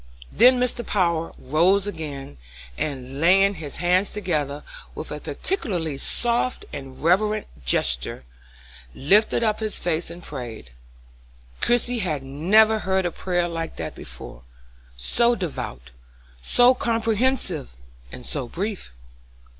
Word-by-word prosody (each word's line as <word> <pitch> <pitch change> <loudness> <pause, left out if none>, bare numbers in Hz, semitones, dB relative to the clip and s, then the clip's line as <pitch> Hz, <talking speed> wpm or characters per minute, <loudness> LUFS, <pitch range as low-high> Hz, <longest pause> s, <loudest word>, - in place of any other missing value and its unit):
Then 250 +3 +6
Mr. 245 -1 0
Power 170 -6 0
rose 175 +8 +2
again, 145 - -6 0.4
and 135 - -4
laying 195 +4 +5
his 155 -6 -6
hands 180 +3 +2
together, 150 -8 -2 0.3
with - - -6
a - - -4
peculiarly 175 - -3
soft 240 - 0
and 135 -2 -8
reverent 210 +5 +2 0.2
gesture, 60 +1 +1 0.7
lifted 210 +10 +3
up 215 -2 +1
his 215 -1 -1
face 170 -1 0
and 170 +1 -10
prayed. 120 - -7 0.9
Christie 240 0 +1
had 155 -9 -2
never 205 +11 +4
heard 190 -1 0
a 175 - 0
prayer 175 0 -1
like 165 -1 -4
that - - -5
before; - - -9 0.6
so 235 - +2
devout, 65 - -5 0.5
so 245 - +5
comprehensive, 225 - 0 0.3
and 125 - -9
so 135 -5 -2
brief. 190 - -4
175 Hz, 120 wpm, -24 LUFS, 145-215 Hz, 0.9 s, Then